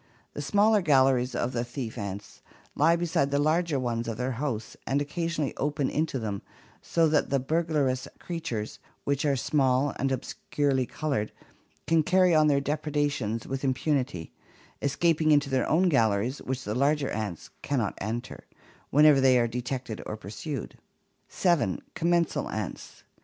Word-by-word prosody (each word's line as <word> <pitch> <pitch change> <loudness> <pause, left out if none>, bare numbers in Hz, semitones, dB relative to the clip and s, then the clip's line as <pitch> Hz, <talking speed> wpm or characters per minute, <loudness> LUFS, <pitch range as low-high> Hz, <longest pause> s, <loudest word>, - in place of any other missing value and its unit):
The - - -5
smaller 205 +6 +3
galleries 130 -5 +3
of 120 - -1
the 120 - 0
thief 120 -1 -6
ants 100 -2 -7 0.3
lie 165 +3 +4
beside 165 -5 0
the 140 - +1
larger 155 0 +1
ones 120 -2 -2
of 115 -2 -3
their 125 +2 -1
hosts 120 -4 -3
and 135 +3 +1
occasionally 155 0 -2
open 145 -1 -1
into 155 -2 -1
them, 105 -4 -3 0.4
so 165 -1 +2
that 150 -1 +2
the 140 - +2
burglarous 145 -3 0
creatures, 160 -12 -5 0.2
which 140 +1 0
are 140 -2 +3
small 135 0 +1
and 135 +1 0
obscurely 130 0 -1
colored, 140 -9 -2 0.5
can 165 -1 +3
carry 180 +2 +4
on 155 -1 +5
their 140 -2 +3
depredations 145 -6 -1
with 135 +1 -4
impunity, 130 - -1 0.5
escaping 155 +3 +2
into 145 -2 +3
their 130 -2 +1
own 175 +5 +3
galleries, 115 - +2
which 130 0 -4
the 105 - -3
larger 140 +3 +1
ants 105 -6 -4
cannot 125 -8 -1
enter, 115 +5 -5 0.4
whenever 150 -1 +6
they 130 -1 +5
are 120 -1 +3
detected 125 -1 -4
and 105 - -5
pursued. 115 - -6 0.5
7. 170 - +1
Commensal 170 0 +1
ants. - - -6
140 Hz, 150 wpm, -27 LUFS, 120-155 Hz, 0.5 s, whenever